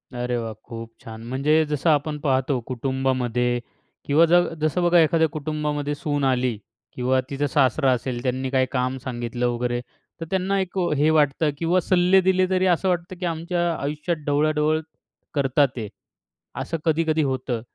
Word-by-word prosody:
अरे 125 Hz, 0 st, -2 dB
वाह! 115 Hz, -1 st, -4 dB
खूप 115 Hz, -1 st, -8 dB
छान. 110 Hz, 0 st, -9 dB
म्हणजे 150 Hz, +4 st, +2 dB
जसं 150 Hz, +2 st, 0 dB
आपण 150 Hz, 0 st, +1 dB
पाहतो 135 Hz, -2 st, +1 dB
कुटुंबामध्ये 125 Hz, -2 st, 0 dB, 0.5 s
किंवा 150 Hz, +4 st, +5 dB
ज -, -, +2 dB, 0.3 s
जसं 155 Hz, +3 st, +1 dB
बघा 175 Hz, 0 st, +5 dB
एखाद्या 160 Hz, 0 st, +4 dB
कुटुंबामध्ये 150 Hz, -1 st, -3 dB
सून 145 Hz, -1 st, -2 dB
आली 125 Hz, -3 st, +1 dB, 0.4 s
किंवा 130 Hz, +1 st, +1 dB
तिचा 145 Hz, +1 st, -1 dB
सासरा 135 Hz, 0 st, +2 dB
असेल, 125 Hz, 0 st, -2 dB
त्यांनी 130 Hz, +1 st, -1 dB
काही 130 Hz, -1 st, +2 dB
काम 130 Hz, 0 st, -1 dB
सांगितलं 120 Hz, -1 st, -2 dB
वगैरे. 120 Hz, 0 st, -1 dB, 0.4 s
तर -, -, -3 dB
त्यांना 190 Hz, +1 st, +1 dB
एक 190 Hz, 0 st, -4 dB, 0.2 s
हे 150 Hz, +2 st, +3 dB
वाटतं 150 Hz, 0 st, +2 dB
किंवा 170 Hz, +3 st, +2 dB
सल्ले 180 Hz, +1 st, +4 dB
दिले 185 Hz, 0 st, +3 dB
तरी 185 Hz, 0 st, +2 dB
असं 185 Hz, +1 st, +2 dB
वाटतं, 175 Hz, +1 st, -2 dB
की 180 Hz, -, -3 dB
आमच्या 170 Hz, +1 st, -1 dB
आयुष्यात 150 Hz, +4 st, -2 dB
ढवळाढवळ 150 Hz, +1 st, +2 dB, 0.5 s
करत 140 Hz, -1 st, 0 dB
आहेत. 130 Hz, -7 st, +1 dB, 0.7 s
असं 165 Hz, -, -3 dB
कधी-कधी 160 Hz, -1 st, +2 dB
होतं. 130 Hz, -3 st, -2 dB
145 Hz, 155 wpm, -23 LUFS, 130-160 Hz, 0.7 s, किंवा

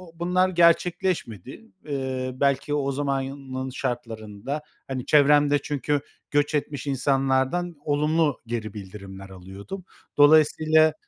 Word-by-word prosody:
bunlar 180 Hz, +2 st, +1 dB
gerçekleşmedi. 170 Hz, -, +1 dB, 0.2 s
Iıı, 130 Hz, -2 st, -3 dB
belki 140 Hz, +1 st, +1 dB
o 140 Hz, -2 st, 0 dB
zamanın 135 Hz, -1 st, -3 dB
şartlarında, 120 Hz, 0 st, -5 dB, 0.3 s
hani, 130 Hz, -2 st, -4 dB
çevremde 145 Hz, 0 st, +5 dB
çünkü 145 Hz, 0 st, -1 dB, 0.3 s
göç 145 Hz, +1 st, +1 dB
etmiş 145 Hz, -2 st, -3 dB
insanlardan 135 Hz, +5 st, 0 dB
olumlu 150 Hz, 0 st, +1 dB
geri 115 Hz, -2 st, -4 dB
bildirimler 95 Hz, -1 st, -9 dB
alıyordum. 95 Hz, -, -9 dB, 0.3 s
Dolayısıyla 155 Hz, +1 st, +5 dB
140 Hz, 100 wpm, -25 LUFS, 130-150 Hz, 0.3 s, çevremde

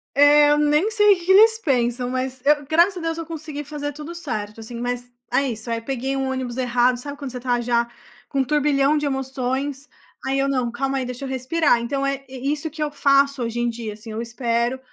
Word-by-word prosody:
Eh, 290 Hz, +1 st, +6 dB
eu 295 Hz, -, +4 dB
nem 300 Hz, +8 st, +2 dB
sei 415 Hz, -2 st, +5 dB
o -, -, -9 dB
que 350 Hz, +2 st, 0 dB
eles 445 Hz, +3 st, +7 dB
pensam. 245 Hz, -, 0 dB
Mas 255 Hz, 0 st, -3 dB
eu, 295 Hz, -1 st, +3 dB
graças 345 Hz, +4 st, +4 dB
a -, -, -5 dB
Deus, 330 Hz, 0 st, -2 dB
eu 330 Hz, -, -4 dB
consegui 310 Hz, -2 st, -6 dB
fazer 290 Hz, 0 st, -5 dB
tudo 305 Hz, +3 st, -8 dB
certo, 220 Hz, -10 st, -5 dB
assim. 235 Hz, +1 st, -8 dB
Mas 245 Hz, 0 st, -4 dB, 0.2 s
é 275 Hz, -1 st, +2 dB
isso. 220 Hz, +1 st, -6 dB
Aí, 230 Hz, 0 st, -1 dB
peguei 270 Hz, +2 st, -3 dB
um 265 Hz, -1 st, -1 dB
ônibus 260 Hz, -2 st, -3 dB
errado. 245 Hz, 0 st, +2 dB
Sabe 285 Hz, +3 st, -7 dB
quando 275 Hz, -3 st, -6 dB
você 250 Hz, -, -6 dB
tá 245 Hz, -1 st, 0 dB
já 235 Hz, 0 st, +1 dB, 0.4 s
com 275 Hz, -, -1 dB
um 265 Hz, -, +4 dB
turbilhão 290 Hz, 0 st, +2 dB
de 295 Hz, -, -1 dB
emoções? 270 Hz, +1 st, -2 dB, 0.4 s
Aí 270 Hz, +1 st, 0 dB
eu: 275 Hz, -, +2 dB
“Não. 255 Hz, -3 st, 0 dB
Calma 270 Hz, +3 st, -1 dB
aí. 260 Hz, -, -2 dB
Deixa 250 Hz, +2 st, -6 dB
eu -, -, -5 dB
respirar.” 260 Hz, +1 st, +2 dB
Então 275 Hz, +4 st, -2 dB
é 275 Hz, 0 st, -2 dB
isso 285 Hz, +4 st, -3 dB
que 310 Hz, +1 st, -9 dB
eu 295 Hz, -, -2 dB
faço 280 Hz, -2 st, +3 dB
hoje 230 Hz, +1 st, -3 dB
em 240 Hz, 0 st, +1 dB
dia, 225 Hz, -2 st, -5 dB
assim. 220 Hz, +1 st, -10 dB
Eu 220 Hz, +1 st, -4 dB
espero. 235 Hz, +1 st, -1 dB
270 Hz, 230 wpm, -22 LUFS, 245-295 Hz, 0.4 s, eles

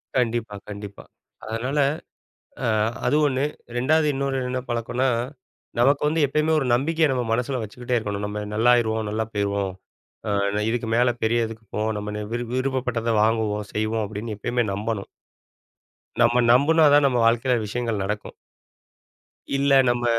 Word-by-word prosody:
கண்டிப்பா 120 Hz, -4 st, 0 dB
கண்டிப்பா. 100 Hz, -1 st, -8 dB, 0.4 s
அதனால 125 Hz, +6 st, -2 dB, 0.9 s
அ -, -, +1 dB, 0.4 s
அது 140 Hz, -, +3 dB
ஒண்ணு 135 Hz, -1 st, 0 dB, 0.3 s
2வது 150 Hz, +6 st, +3 dB
இன்னொரு 135 Hz, 0 st, -1 dB
என்ன 130 Hz, 0 st, -2 dB
பழக்கன்னா, 120 Hz, +2 st, -1 dB, 0.7 s
நமக்கு 135 Hz, +4 st, +3 dB
வந்து 155 Hz, 0 st, +2 dB
எப்பயுமே 155 Hz, +3 st, +1 dB
ஒரு 135 Hz, -, 0 dB
நம்பிக்கைய 160 Hz, +6 st, +2 dB
நம்ம 125 Hz, -2 st, -1 dB
மனசுல 125 Hz, +2 st, -1 dB
வச்சுக்கிட்டே 120 Hz, +3 st, -3 dB
இருக்கணும். 105 Hz, -2 st, -4 dB
“நம்ம 105 Hz, 0 st, -4 dB
நல்லாருவோம், 110 Hz, -1 st, +3 dB
நல்லா 110 Hz, +1 st, -1 dB
போயிருவோம். 100 Hz, -1 st, -1 dB, 0.5 s
அ -, -, -1 dB, 0.3 s
நா -, -, +1 dB
இதுக்கு 115 Hz, -1 st, -2 dB
மேல 120 Hz, +1 st, +4 dB
பெரிய 115 Hz, +1 st, +2 dB
இதுக்கு 110 Hz, 0 st, -10 dB
போவோம். 110 Hz, +1 st, 0 dB
நம்ம 105 Hz, 0 st, -5 dB
ந -, -, -4 dB
விரு 120 Hz, +1 st, -2 dB
விருப்பப்பட்டத 130 Hz, -3 st, -1 dB
வாங்குவோம், 110 Hz, -2 st, 0 dB
செய்வோம்” 110 Hz, +1 st, 0 dB
அப்படின்னு 110 Hz, +2 st, -5 dB
எப்பயுமே 120 Hz, +3 st, 0 dB
நம்பணும். 105 Hz, 0 st, -3 dB, 1.1 s
நம்ம 120 Hz, +1 st, +4 dB
நம்புனாதான், 145 Hz, +2 st, +5 dB
நம்ம 125 Hz, -3 st, +1 dB
வாழ்க்கையில 120 Hz, +2 st, +3 dB
விஷயங்கள் 115 Hz, -1 st, -2 dB
நடக்கும். 105 Hz, +2 st, -4 dB, 1.2 s
இல்ல, 140 Hz, 0 st, +2 dB, 0.2 s
நம்ம 120 Hz, 0 st, 0 dB
120 Hz, 140 wpm, -24 LUFS, 110-130 Hz, 1.2 s, நம்புனாதான்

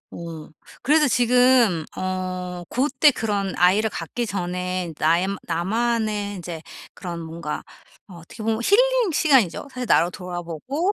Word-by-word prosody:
어. 165 Hz, -2 st, -8 dB, 0.3 s
그래서 300 Hz, +2 st, +4 dB
지금 245 Hz, -7 st, +4 dB
어 185 Hz, -1 st, -4 dB
고때 275 Hz, +3 st, +3 dB
그런 205 Hz, -6 st, -2 dB
아이를 195 Hz, +5 st, +3 dB
갖기 220 Hz, +9 st, -4 dB
전에 180 Hz, -3 st, -3 dB
나의 170 Hz, +4 st, +3 dB, 0.2 s
나만의 210 Hz, +3 st, -1 dB
이제 165 Hz, -2 st, -7 dB, 0.3 s
그런 175 Hz, -2 st, -6 dB
뭔가 160 Hz, -1 st, -5 dB, 0.5 s
어 185 Hz, -, -12 dB
어떻게 170 Hz, +7 st, -11 dB
보면 220 Hz, 0 st, 0 dB
힐링 -, -, +3 dB
시간이죠. 270 Hz, -, +2 dB
사실 255 Hz, -1 st, -5 dB
나로 175 Hz, -, +4 dB
돌아보고 180 Hz, -, -3 dB
195 Hz, 270 characters per minute, -23 LUFS, 175-245 Hz, 0.5 s, 그래서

